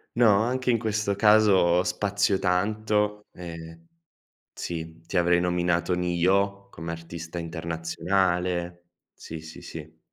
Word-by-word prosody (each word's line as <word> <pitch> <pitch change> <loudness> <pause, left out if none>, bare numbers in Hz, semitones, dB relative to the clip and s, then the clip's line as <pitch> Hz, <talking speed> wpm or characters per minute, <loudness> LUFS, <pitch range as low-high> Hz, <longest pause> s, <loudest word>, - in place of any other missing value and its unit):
No, 115 -4 +5
anche 125 +2 0
in 115 - +2
questo 105 -2 -1
caso, 100 -4 +5
spazio 100 +2 0
tanto. 105 +2 0
Ehm 85 -1 -9 0.7
sì. 80 -1 -6
Ti 95 - -4
avrei 85 0 +4
nominato 90 0 +1
Ne-Yo 95 +3 +1
come 85 +1 -6
artista 85 0 -7
internazionale. 85 +2 -1 0.3
Sì, 80 0 -8
sì, 80 0 -11
sì. 80 0 -10
90 Hz, 115 wpm, -26 LUFS, 85-100 Hz, 0.7 s, No